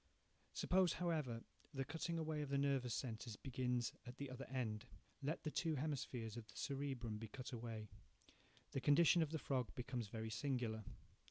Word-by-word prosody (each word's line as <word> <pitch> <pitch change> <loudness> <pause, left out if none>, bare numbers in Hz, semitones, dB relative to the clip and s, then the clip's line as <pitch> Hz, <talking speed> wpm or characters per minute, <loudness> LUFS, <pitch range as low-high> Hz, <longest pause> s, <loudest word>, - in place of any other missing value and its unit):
Suppose, 185 -2 +4
however, 155 -10 0 0.3
the 135 0 0
cutting 165 +4 -1
away 155 -2 0
of 145 - -2
the 140 - +3
nervous 135 -4 +3
centres 115 -3 -3
begins 125 -1 0
at 125 +2 -6
the 140 -2 -3
other 130 +1 -5
end. 115 -5 -1 0.3
Let 150 +4 -1
the 155 - -1
two 160 -1 +2
hemispheres 130 -6 -1
of 115 -2 -6
the - - -13
cerebrum 135 -6 -1
be 115 - -4
cut 130 +4 -6
away. 115 -3 -4 0.8
The 135 - 0
condition 165 +4 +7
of 160 - +3
the 160 - 0
frog 130 - 0
becomes 125 -2 -2
very 110 +1 -3
singular. 115 -3 0
130 Hz, 170 wpm, -43 LUFS, 115-145 Hz, 0.8 s, condition